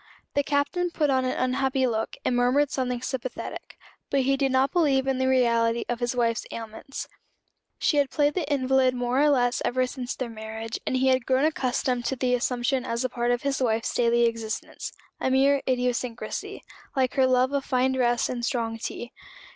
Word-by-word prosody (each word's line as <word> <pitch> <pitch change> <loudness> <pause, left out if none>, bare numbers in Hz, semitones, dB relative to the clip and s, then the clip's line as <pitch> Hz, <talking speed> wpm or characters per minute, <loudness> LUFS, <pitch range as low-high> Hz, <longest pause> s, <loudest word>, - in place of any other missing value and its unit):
The 285 - +3
Captain 290 +5 0
put 300 -4 +1
on 260 -1 +2
an 255 - -1
unhappy 260 +1 +1
look, 225 -2 -2
and 250 - +1
murmured 255 +4 +3
something 250 -2 -2
sympathetic: 255 -1 -5 0.3
but 275 - +2
he 270 +1 +2
did 270 -1 0
not 260 +1 +2
believe 280 -6 +2
in 265 -1 0
the 260 - +1
reality 235 -2 +2
of 240 -1 -2
his 240 0 -1
wife's 230 -1 0
ailments. 225 +4 -7 0.7
She 295 - +1
had 280 -2 +3
played 295 -1 +2
the 315 -6 -2
invalid 260 -2 +2
more 245 +2 +1
or 300 - +5
less 245 -3 +2
ever 255 +1 +1
since 255 -1 -5
their 255 - -3
marriage; 220 0 -6
and 260 - +1
he 265 +1 +3
had 255 -2 +1
grown 265 +2 +3
accustomed 255 -4 0
to 265 - 0
the 250 -1 0
assumption 250 +1 0
as 235 -1 -2
a - - 0
part 240 0 -1
of 245 -1 0
his 275 -1 -1
wife's 225 -2 0
daily 235 0 +3
existence 225 -1 -3 0.3
a - - 0
mere 270 +1 +3
idiosyncrasy, 250 -1 -2 0.3
like 260 -2 +1
her 265 -2 +3
love 255 +1 +2
of 280 -1 0
fine 260 0 +1
dress 240 -2 +1
and 240 -1 -4
strong 230 -4 -1
tea. 240 +2 -5
255 Hz, 195 wpm, -26 LUFS, 240-270 Hz, 0.7 s, or